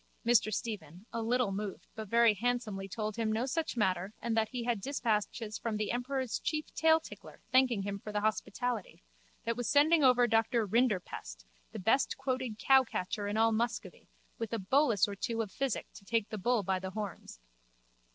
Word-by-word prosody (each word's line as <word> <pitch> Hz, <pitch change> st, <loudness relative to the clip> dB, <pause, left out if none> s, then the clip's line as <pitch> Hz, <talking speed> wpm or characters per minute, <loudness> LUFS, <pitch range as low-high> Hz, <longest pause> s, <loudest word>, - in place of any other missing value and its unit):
Mr 235 Hz, -2 st, +4 dB
Stephen, 200 Hz, -4 st, -5 dB
a 230 Hz, -, -2 dB
little 240 Hz, -1 st, +1 dB
moved 200 Hz, 0 st, -5 dB
but 220 Hz, -1 st, -6 dB
very 230 Hz, +1 st, +5 dB
handsomely 215 Hz, -3 st, -2 dB
told 215 Hz, +1 st, -3 dB
him 225 Hz, -1 st, 0 dB
no 225 Hz, +3 st, 0 dB
such 315 Hz, 0 st, -2 dB
matter 190 Hz, -1 st, 0 dB
and 235 Hz, -1 st, -2 dB
that 220 Hz, -1 st, +2 dB
he 250 Hz, -2 st, -4 dB
had 235 Hz, -4 st, -1 dB
dispatches 220 Hz, -3 st, -1 dB
from 225 Hz, -2 st, -2 dB
the 210 Hz, 0 st, -1 dB
emperor's 255 Hz, +1 st, -2 dB
chief 305 Hz, 0 st, -2 dB
tailtickler 320 Hz, 0 st, 0 dB
thanking 255 Hz, -6 st, +4 dB
him 200 Hz, 0 st, -4 dB
for 210 Hz, -, -7 dB
the 210 Hz, 0 st, -1 dB
hospitality, 215 Hz, -3 st, -2 dB, 0.4 s
that 230 Hz, 0 st, 0 dB
was 245 Hz, 0 st, -2 dB
sending 305 Hz, +2 st, +5 dB
over 250 Hz, -2 st, +6 dB
Doctor 225 Hz, 0 st, +2 dB
Rinderpest, 195 Hz, -, -1 dB, 0.3 s
the -, -, -7 dB
bestquoted 255 Hz, +2 st, 0 dB
cowcatcher 225 Hz, -6 st, +2 dB
in 205 Hz, -, -2 dB
all 225 Hz, 0 st, +4 dB
Muscovy, 235 Hz, +2 st, -2 dB, 0.3 s
with 230 Hz, -2 st, -3 dB
a -, -, +1 dB
bolus 225 Hz, -, +3 dB
or 205 Hz, -, -5 dB
two 230 Hz, +3 st, -3 dB
of 205 Hz, -, -9 dB
physic 270 Hz, -1 st, -2 dB
to -, -, -13 dB
take 225 Hz, +1 st, 0 dB
the 215 Hz, -, -5 dB
bull 240 Hz, +2 st, +1 dB
by 190 Hz, 0 st, 0 dB
the 190 Hz, 0 st, -5 dB
horns. 200 Hz, -, -6 dB
225 Hz, 180 wpm, -32 LUFS, 205-245 Hz, 0.4 s, over